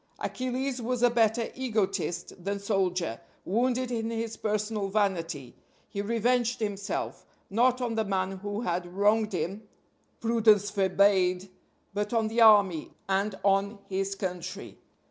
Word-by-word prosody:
Achilles 255 Hz, 0 st, -3 dB
was 245 Hz, +1 st, -1 dB
a 245 Hz, -, +6 dB
better 230 Hz, 0 st, +2 dB
egotist 195 Hz, -8 st, -2 dB
than 200 Hz, +2 st, -1 dB
soldier; 185 Hz, -, -1 dB, 0.2 s
wounded 250 Hz, +4 st, 0 dB
in 225 Hz, -1 st, -1 dB
his 225 Hz, -1 st, -3 dB
personal 210 Hz, -1 st, -1 dB
vanity, 175 Hz, -, -1 dB, 0.3 s
he 200 Hz, -, -3 dB
revenged 235 Hz, +3 st, +1 dB
himself, 205 Hz, -2 st, -3 dB, 0.3 s
not 250 Hz, +4 st, +3 dB
on 240 Hz, -2 st, -1 dB
the 220 Hz, 0 st, +1 dB
man 190 Hz, -1 st, -1 dB
who 205 Hz, +2 st, -4 dB
had 175 Hz, -5 st, -2 dB
wronged 205 Hz, +3 st, +2 dB
him 180 Hz, +5 st, -2 dB, 0.6 s
Prudence 220 Hz, -3 st, +3 dB
forbade 190 Hz, -1 st, +2 dB, 0.4 s
but 205 Hz, +2 st, -2 dB
on 225 Hz, -2 st, +2 dB
the 230 Hz, +2 st, +1 dB
army, 200 Hz, -7 st, +6 dB, 0.2 s
and 195 Hz, +1 st, 0 dB
on 200 Hz, +1 st, +2 dB
his 195 Hz, +1 st, -1 dB
country. 185 Hz, -1 st, -5 dB
205 Hz, 130 wpm, -28 LUFS, 190-230 Hz, 0.6 s, a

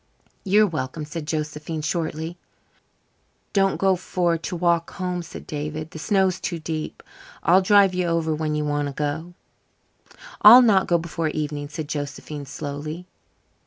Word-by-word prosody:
"You're 210 Hz, +2 st, +4 dB
welcome," 155 Hz, -4 st, -4 dB
said 150 Hz, 0 st, -6 dB
Josephine 155 Hz, 0 st, -3 dB
shortly. 160 Hz, +1 st, -2 dB, 1.2 s
"Don't 195 Hz, -1 st, +2 dB
go 190 Hz, -1 st, +3 dB
for 175 Hz, -1 st, 0 dB
to 165 Hz, +2 st, -5 dB
walk 170 Hz, -1 st, +1 dB
home," 180 Hz, -1 st, -3 dB
said 170 Hz, -, -10 dB
David; 150 Hz, +1 st, -5 dB
"the 160 Hz, -, -8 dB
snow 195 Hz, +3 st, +2 dB
is 185 Hz, -1 st, -1 dB
too 170 Hz, -, -3 dB
deep. 155 Hz, -1 st, -5 dB, 0.4 s
I'll 185 Hz, +3 st, +5 dB
drive 195 Hz, 0 st, +5 dB
you 180 Hz, -1 st, 0 dB
over 165 Hz, -1 st, 0 dB
when 155 Hz, 0 st, -2 dB
you 150 Hz, 0 st, -1 dB
want 145 Hz, 0 st, 0 dB
to 140 Hz, -, -7 dB
go." 160 Hz, +4 st, -3 dB, 1.1 s
"I'll 235 Hz, +5 st, +10 dB
not 200 Hz, -5 st, +4 dB
go 170 Hz, -, +3 dB
before 165 Hz, -1 st, -3 dB
the -, -, -6 dB
evening," 145 Hz, -1 st, -3 dB
said 150 Hz, 0 st, -5 dB
Josephine 145 Hz, 0 st, -5 dB
slowly. 150 Hz, +4 st, -6 dB
160 Hz, 160 wpm, -23 LUFS, 150-180 Hz, 1.2 s, I'll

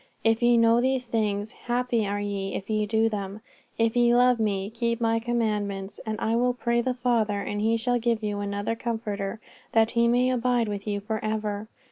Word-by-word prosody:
If 225 Hz, +1 st, +2 dB
ye 240 Hz, 0 st, +5 dB
know 230 Hz, +1 st, +5 dB
these 260 Hz, 0 st, 0 dB
things, 210 Hz, -2 st, -1 dB
happy 240 Hz, -3 st, -1 dB
are 205 Hz, +1 st, -2 dB
ye 200 Hz, -1 st, -3 dB
if 200 Hz, -, -5 dB
ye 215 Hz, -1 st, +1 dB
do 220 Hz, +1 st, +2 dB
them. 205 Hz, -1 st, -4 dB, 0.4 s
If 230 Hz, 0 st, +1 dB
ye 240 Hz, 0 st, +4 dB
love 250 Hz, -1 st, +4 dB
Me, 200 Hz, -2 st, -1 dB
keep 235 Hz, 0 st, -1 dB
My 225 Hz, -1 st, +2 dB
commandments. 210 Hz, -4 st, -2 dB
And 215 Hz, 0 st, -2 dB
I 225 Hz, 0 st, 0 dB
will 245 Hz, +1 st, +2 dB
pray 235 Hz, -1 st, +1 dB
the 250 Hz, +1 st, -1 dB
Father, 230 Hz, -5 st, +1 dB
and 205 Hz, +1 st, -3 dB
He 225 Hz, +2 st, +2 dB
shall 245 Hz, +1 st, 0 dB
give 230 Hz, -1 st, 0 dB
you 205 Hz, -1 st, -2 dB
another 205 Hz, +2 st, -2 dB
Comforter, 220 Hz, -3 st, -3 dB, 0.3 s
that 225 Hz, 0 st, +4 dB
He 235 Hz, 0 st, +3 dB
may 250 Hz, +2 st, +3 dB
abide 245 Hz, -2 st, +1 dB
with 205 Hz, 0 st, -5 dB
you 205 Hz, -1 st, -1 dB
for 220 Hz, +1 st, -3 dB
ever. 215 Hz, -1 st, -2 dB
225 Hz, 200 wpm, -26 LUFS, 205-235 Hz, 0.4 s, ye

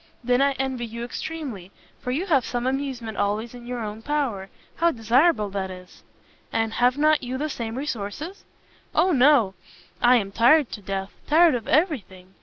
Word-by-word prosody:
"Then 250 Hz, +2 st, +2 dB
I 280 Hz, 0 st, +3 dB
envy 260 Hz, -3 st, -3 dB
you 235 Hz, +1 st, -6 dB
extremely, 245 Hz, -, -6 dB, 0.3 s
for -, -, -6 dB
you 295 Hz, +9 st, -1 dB
have 285 Hz, -9 st, +3 dB
some 245 Hz, +1 st, -3 dB
amusement 260 Hz, -5 st, -3 dB
always 215 Hz, +4 st, -1 dB
in 240 Hz, -1 st, -11 dB
your 245 Hz, -2 st, -4 dB
own 215 Hz, +1 st, -6 dB
power. 235 Hz, -9 st, -2 dB, 0.3 s
How 340 Hz, +1 st, +4 dB
desirable 235 Hz, -, +2 dB
that 190 Hz, -1 st, -3 dB
is!" 180 Hz, -1 st, -12 dB, 0.5 s
"And 225 Hz, 0 st, 0 dB
have 250 Hz, +2 st, +2 dB
not 305 Hz, +1 st, +3 dB
you 255 Hz, 0 st, -4 dB
the 305 Hz, +3 st, -2 dB
same 230 Hz, -1 st, -5 dB
resources?" 285 Hz, -, -5 dB, 0.5 s
"O 370 Hz, -, +4 dB
no! 260 Hz, -, +4 dB, 0.5 s
I 245 Hz, +1 st, +6 dB
am 200 Hz, -5 st, 0 dB
tired 250 Hz, +6 st, +4 dB
to 210 Hz, -, -7 dB
death! 195 Hz, 0 st, -4 dB, 0.2 s
tired 325 Hz, +2 st, +5 dB
of 235 Hz, -3 st, -3 dB
every 310 Hz, -1 st, +3 dB
thing! 185 Hz, -1 st, -17 dB
245 Hz, 180 wpm, -24 LUFS, 215-285 Hz, 0.5 s, I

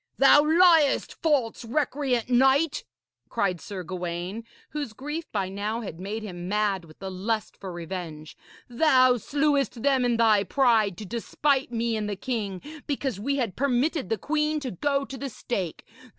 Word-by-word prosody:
'Thou 275 Hz, +1 st, +7 dB
liest, 320 Hz, -1 st, +4 dB
false, 275 Hz, -9 st, +1 dB
recreant 260 Hz, -1 st, 0 dB
knight!' 270 Hz, +5 st, +3 dB, 0.4 s
cried 180 Hz, -4 st, -1 dB
Sir 190 Hz, -3 st, -6 dB
Gawaine, 180 Hz, +4 st, -4 dB, 0.3 s
whose 290 Hz, -7 st, -4 dB
grief 295 Hz, +7 st, -6 dB
by 195 Hz, -3 st, -1 dB
now 205 Hz, +4 st, -3 dB
had 185 Hz, -7 st, -7 dB
made 210 Hz, +4 st, -4 dB
him 175 Hz, -4 st, -6 dB
mad 205 Hz, -3 st, 0 dB
with 155 Hz, -1 st, -16 dB
the 190 Hz, -1 st, -6 dB
lust 210 Hz, +4 st, -2 dB
for 190 Hz, -2 st, -8 dB
revenge; 170 Hz, -3 st, -7 dB, 0.3 s
'thou 255 Hz, -1 st, +4 dB
slewest 280 Hz, -2 st, 0 dB
them 270 Hz, -2 st, +3 dB
in 240 Hz, -1 st, +2 dB
thy 220 Hz, -3 st, +4 dB
pride, 220 Hz, -5 st, +2 dB
to 215 Hz, -, -7 dB
despite 265 Hz, +5 st, 0 dB
me 230 Hz, -1 st, 0 dB
and 210 Hz, -1 st, -2 dB
the 205 Hz, -, -2 dB
king, 200 Hz, -4 st, -4 dB, 0.2 s
because 270 Hz, -7 st, -2 dB
we 275 Hz, +7 st, -1 dB
had 235 Hz, -9 st, -1 dB
permitted 275 Hz, -, 0 dB
the 225 Hz, -, 0 dB
queen 300 Hz, +5 st, 0 dB
to 260 Hz, -3 st, -4 dB
go 275 Hz, -, 0 dB
to 270 Hz, -1 st, -8 dB
the 275 Hz, -, -4 dB
stake. 195 Hz, -8 st, -4 dB
235 Hz, 165 wpm, -26 LUFS, 195-275 Hz, 0.4 s, Thou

